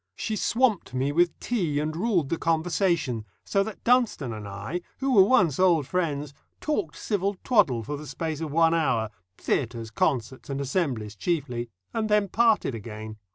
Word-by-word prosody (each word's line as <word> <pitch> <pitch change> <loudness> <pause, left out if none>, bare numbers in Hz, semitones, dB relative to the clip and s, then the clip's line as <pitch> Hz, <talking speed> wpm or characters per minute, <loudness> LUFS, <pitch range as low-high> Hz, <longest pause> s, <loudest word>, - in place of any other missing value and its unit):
She 220 - -2
swamped 220 - +1
me 135 +2 +1
with 170 +2 +2
tea 175 -12 -1
and 155 +1 -2
ruled 175 -6 +1
the 165 - -1
conversation, 165 - +1 0.2
so 195 - +2
that 210 0 -5
Dunstone 235 - +2
and 105 -2 -7
I, 100 - -5 0.2
who 270 0 0
were 200 - +8
once 190 - +4
old 175 -6 +4
friends, 150 -4 -2 0.3
talked 205 - -2
civil 200 -1 -1
twaddle 175 - +3
for 145 +6 -4
the 150 +1 -9
space 155 +3 -4
of 155 -3 -3
one 165 +1 +4
hour 125 -9 +1 0.3
theatres, 115 -3 -2
concerts, 125 +2 -1
and 140 0 -2
assemblies 130 - -1
chiefly 125 - -2 0.2
and 220 -1 -1
then 210 -2 +3
parted 225 - +3
again. 110 -1 -7
160 Hz, 165 wpm, -26 LUFS, 130-195 Hz, 0.3 s, were